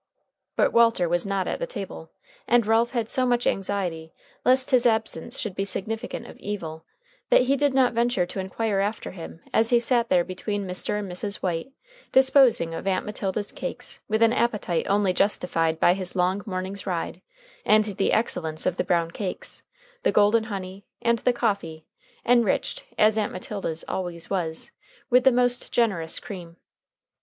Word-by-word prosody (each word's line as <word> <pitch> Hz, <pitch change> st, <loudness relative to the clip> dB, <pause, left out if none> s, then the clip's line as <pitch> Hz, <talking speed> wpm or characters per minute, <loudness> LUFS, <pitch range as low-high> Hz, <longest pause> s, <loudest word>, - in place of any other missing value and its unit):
But -, -, +2 dB
Walter 230 Hz, -6 st, +4 dB
was 175 Hz, +3 st, 0 dB
not 195 Hz, -2 st, -1 dB
at -, -, -2 dB
the -, -, -2 dB
table, -, -, -7 dB, 0.4 s
and 240 Hz, -2 st, +4 dB
Ralph 225 Hz, +2 st, +3 dB
had 235 Hz, -3 st, -2 dB
so 255 Hz, -, +2 dB
much 245 Hz, -1 st, +1 dB
anxiety 180 Hz, -5 st, -2 dB, 0.3 s
lest 255 Hz, +1 st, +3 dB
his 250 Hz, -1 st, +5 dB
absence 220 Hz, 0 st, -1 dB
should 215 Hz, -5 st, -3 dB
be 195 Hz, -, -2 dB
significant 215 Hz, +3 st, -4 dB
of -, -, -12 dB
evil, 165 Hz, -6 st, -5 dB, 0.4 s
that -, -, +6 dB
he 270 Hz, +2 st, +2 dB
did 280 Hz, -1 st, +1 dB
not 255 Hz, -2 st, +4 dB
venture 235 Hz, -5 st, +1 dB
to 185 Hz, -, -6 dB
inquire 195 Hz, +2 st, -1 dB
after 205 Hz, +2 st, -2 dB
him 165 Hz, -2 st, -9 dB
as 225 Hz, +1 st, +3 dB
he 240 Hz, -, +5 dB
sat 235 Hz, 0 st, +1 dB
there 180 Hz, -2 st, +4 dB
between 195 Hz, +3 st, -4 dB
Mr. 180 Hz, +3 st, -2 dB
and 200 Hz, -3 st, -4 dB
Mrs. 200 Hz, +3 st, -4 dB
White 175 Hz, +7 st, -2 dB, 0.4 s
disposing 265 Hz, -, +4 dB
of 165 Hz, -, -5 dB
Aunt 185 Hz, -1 st, 0 dB
Matilda's 205 Hz, 0 st, -3 dB
cakes -, -, -6 dB
with 220 Hz, +1 st, +2 dB
an 230 Hz, 0 st, +5 dB
appetite 210 Hz, -8 st, 0 dB
only 200 Hz, -2 st, +2 dB
justified 165 Hz, -5 st, +1 dB
by 175 Hz, -, +5 dB
his 185 Hz, -1 st, -4 dB
long 185 Hz, +2 st, +1 dB
morning's 190 Hz, +1 st, -4 dB
ride 175 Hz, -3 st, -3 dB, 0.4 s
and 215 Hz, 0 st, +5 dB
the 200 Hz, -2 st, -1 dB
excellence 160 Hz, -8 st, -1 dB
of 185 Hz, 0 st, 0 dB
the -, -, +1 dB
brown 170 Hz, -2 st, +1 dB
cakes, 190 Hz, 0 st, -5 dB, 0.4 s
the -, -, +2 dB
golden 210 Hz, +2 st, +4 dB
honey, 195 Hz, -2 st, -6 dB, 0.2 s
and 235 Hz, -1 st, +2 dB
the 250 Hz, -, +2 dB
coffee, 200 Hz, -10 st, -2 dB, 0.4 s
enriched, 235 Hz, -4 st, +2 dB
as 215 Hz, +1 st, +4 dB
Aunt 210 Hz, -, -1 dB
Matilda's 185 Hz, -3 st, -5 dB
always 175 Hz, -2 st, -4 dB
was, 165 Hz, -4 st, -2 dB, 0.4 s
with 250 Hz, +1 st, +5 dB
the 265 Hz, -, +7 dB
most 245 Hz, 0 st, +1 dB
generous 190 Hz, -9 st, 0 dB
cream. 175 Hz, -4 st, -9 dB
200 Hz, 170 wpm, -25 LUFS, 180-230 Hz, 0.4 s, the